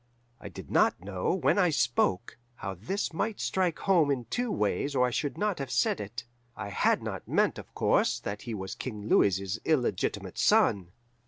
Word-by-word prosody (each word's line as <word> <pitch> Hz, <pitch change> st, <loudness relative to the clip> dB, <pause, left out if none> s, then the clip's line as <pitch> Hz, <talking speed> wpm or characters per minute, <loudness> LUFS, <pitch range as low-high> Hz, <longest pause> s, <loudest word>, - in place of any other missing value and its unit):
"I -, -, -8 dB
did -, -, -10 dB
not -, -, +3 dB
know, 95 Hz, 0 st, -2 dB
when 190 Hz, -, +2 dB
I 180 Hz, -3 st, +4 dB
spoke, 120 Hz, -, 0 dB, 0.2 s
how 95 Hz, -4 st, -5 dB
this 130 Hz, -, -3 dB
might 215 Hz, +6 st, -2 dB
strike 180 Hz, -4 st, 0 dB
home 175 Hz, -7 st, +3 dB
in 130 Hz, -4 st, -1 dB
two 245 Hz, -2 st, -1 dB
ways 105 Hz, -, -1 dB
or 125 Hz, -1 st, +4 dB
I 125 Hz, -, -1 dB
should 145 Hz, +3 st, -2 dB
not 205 Hz, -4 st, -1 dB
have 135 Hz, -2 st, -4 dB
said 120 Hz, -3 st, +1 dB
it. 110 Hz, +4 st, -7 dB, 0.3 s
I 100 Hz, -, -6 dB
had 100 Hz, -, +1 dB
not -, -, -5 dB
meant, -, -, +1 dB
of -, -, -12 dB
course, -, -, +2 dB
that 100 Hz, +1 st, -5 dB
he 115 Hz, -2 st, -5 dB
was 95 Hz, -1 st, -5 dB
King 105 Hz, -5 st, -6 dB
Louis's 100 Hz, 0 st, +2 dB
illegitimate 150 Hz, -6 st, -1 dB
son. 90 Hz, -3 st, +3 dB
120 Hz, 185 wpm, -29 LUFS, 100-160 Hz, 0.3 s, I